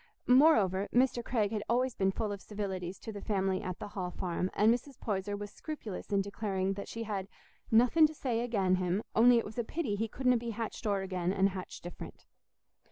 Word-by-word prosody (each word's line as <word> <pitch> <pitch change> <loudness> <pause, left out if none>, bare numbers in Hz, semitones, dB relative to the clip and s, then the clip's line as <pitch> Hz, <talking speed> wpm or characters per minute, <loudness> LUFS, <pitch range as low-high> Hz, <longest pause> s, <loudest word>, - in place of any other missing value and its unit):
Moreover, 215 - +5
Mr. 245 -1 +2
Craig 215 -4 0
had 215 -2 -1
always 250 +2 +2
been 195 -2 +1
full 215 +1 -2
of 200 -1 -5
civilities 190 -3 -4
to 225 - -6
the 205 -2 -7
family 190 -3 0
at 185 -1 -4
the - - -7
Hall 185 -3 -4
Farm, 180 0 -2
and 220 +3 +5
Mrs. 250 +2 -5
Poyser 205 -1 -2
was 205 0 -7
scrupulous 225 - -7
in 200 -1 +3
declaring 195 -1 -2
that 200 0 -6
she 230 - -5
had 200 -3 -3 0.4
"nothing 250 +8 +6
to 310 - -9
say 245 -5 -1
again' 195 -6 +1
him, 185 +3 0
on'y 240 +2 +7
it 230 - 0
was 215 +3 -6
a - - +1
pity 270 -2 -2
he 225 +2 -1
couldna 250 +2 +2
be 235 0 -4
hatched 225 0 -4
o'er 200 -2 +1
again, 185 -2 -1
an' 195 0 +2
hatched 190 -2 -3
different." 175 0 -9
205 Hz, 210 wpm, -32 LUFS, 190-235 Hz, 0.4 s, on'y